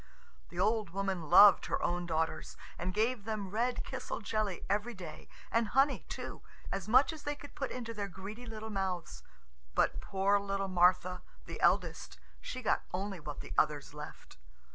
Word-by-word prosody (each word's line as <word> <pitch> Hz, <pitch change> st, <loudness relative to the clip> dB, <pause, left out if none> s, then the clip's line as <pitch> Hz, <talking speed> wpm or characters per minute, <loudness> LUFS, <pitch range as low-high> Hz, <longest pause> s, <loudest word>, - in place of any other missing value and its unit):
The -, -, -7 dB
old 215 Hz, -3 st, +2 dB
woman 190 Hz, -3 st, -2 dB
loved 205 Hz, +4 st, +8 dB
her -, -, 0 dB
own 175 Hz, 0 st, 0 dB
daughters, 160 Hz, -1 st, -1 dB, 0.2 s
and 180 Hz, +2 st, -1 dB
gave 220 Hz, +3 st, +1 dB
them 210 Hz, -3 st, -3 dB
red 240 Hz, +4 st, 0 dB
kisel 260 Hz, -2 st, -5 dB
jelly 215 Hz, -3 st, -2 dB
every 210 Hz, +4 st, 0 dB
day, 175 Hz, -5 st, -9 dB, 0.2 s
and 230 Hz, -1 st, +2 dB
honey 270 Hz, +5 st, +2 dB
too, -, -, -6 dB, 0.3 s
as 195 Hz, 0 st, -3 dB
much 260 Hz, +8 st, +5 dB
as 310 Hz, -, -9 dB
they 290 Hz, 0 st, -2 dB
could 285 Hz, -, -12 dB
put 270 Hz, -, -3 dB
into 230 Hz, -2 st, -5 dB
their 205 Hz, -2 st, -3 dB
greedy 200 Hz, +6 st, -8 dB
little 220 Hz, 0 st, -6 dB
mouths. 185 Hz, -4 st, -3 dB, 0.5 s
But -, -, +2 dB
poor 200 Hz, 0 st, +2 dB
little 195 Hz, -1 st, -2 dB
Martha, 180 Hz, 0 st, +3 dB, 0.2 s
the -, -, -7 dB
eldest, -, -, +1 dB, 0.2 s
she 255 Hz, 0 st, -6 dB
got -, -, +2 dB
only 195 Hz, 0 st, -3 dB
what 150 Hz, -2 st, -6 dB
the -, -, -8 dB
others 150 Hz, -2 st, 0 dB
left. 150 Hz, +1 st, -10 dB
200 Hz, 170 wpm, -33 LUFS, 180-225 Hz, 0.5 s, loved